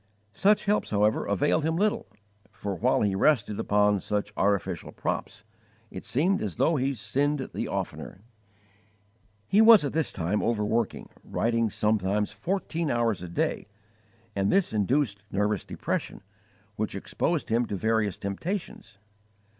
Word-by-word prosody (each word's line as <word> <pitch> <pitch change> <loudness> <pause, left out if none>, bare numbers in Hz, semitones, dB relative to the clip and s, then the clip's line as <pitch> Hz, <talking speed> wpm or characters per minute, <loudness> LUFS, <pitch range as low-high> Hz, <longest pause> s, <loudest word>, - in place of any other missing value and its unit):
Such 205 - +3
helps, 210 +1 +1
however, 105 +1 +1
availed 145 +9 +1
him 160 +1 0
little, 205 - 0 0.4
for 100 - -5
while 90 - +1
he 100 -2 +1
rested 105 -1 +2
upon 105 0 +2
such 105 +1 -3
artificial 95 -3 0
props, - - -4 0.5
it - - -7
seemed 180 +9 +1
as 100 -6 -3
though 165 - +2
he 135 0 0
sinned 140 +4 -1
the - - -3
oftener. 95 - -5 1.3
He 205 - +4
was 220 -7 +8
at 140 - -3
this 160 -2 0
time 95 +4 -1
overworking, 110 0 -1
writing 115 -1 0
sometimes 105 -1 0
fourteen 170 -4 -2
hours 115 -5 0
a 90 - -7
day, 85 - -1 0.7
and 100 0 +1
this 195 - +2
induced 105 -1 0
nervous 105 -1 0
depression, - - -4 0.5
which 110 -2 -2
exposed 155 - -2
him 115 +1 +1
to 100 - -3
various 110 -1 0
temptations. 130 - -5
110 Hz, 140 wpm, -27 LUFS, 100-150 Hz, 1.3 s, was